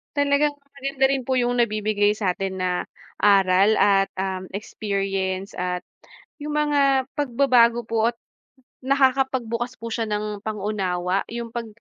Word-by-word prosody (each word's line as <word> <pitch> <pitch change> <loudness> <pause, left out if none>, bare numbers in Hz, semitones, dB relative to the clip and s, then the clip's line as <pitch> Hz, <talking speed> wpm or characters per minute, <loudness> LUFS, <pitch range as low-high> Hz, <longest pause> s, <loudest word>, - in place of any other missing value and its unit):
Talagang 285 +1 +2 0.2
maganda 270 0 0
rin 270 -2 -1
po 260 - 0
yung 245 -1 +1
nabibigay 210 -2 +2
sa 195 -4 -1
atin 190 -1 -3
na 180 - +1 0.5
aral 195 0 +4
at, 195 -1 +4
um, 190 0 -3
experience 195 -2 -3
at 180 0 -2 0.6
yung 295 0 -5
mga 280 -3 +2
pagbabago 245 -4 +3
po 225 0 +2
at - - -38 0.7
nakakapagbukas 260 -3 +1
po 230 0 -6
siya 225 0 -2
ng 210 0 -3
pang-unawa. 195 -3 -1
Yung 235 0 -5
pag 235 0 -5
225 Hz, 130 wpm, -23 LUFS, 195-260 Hz, 0.7 s, aral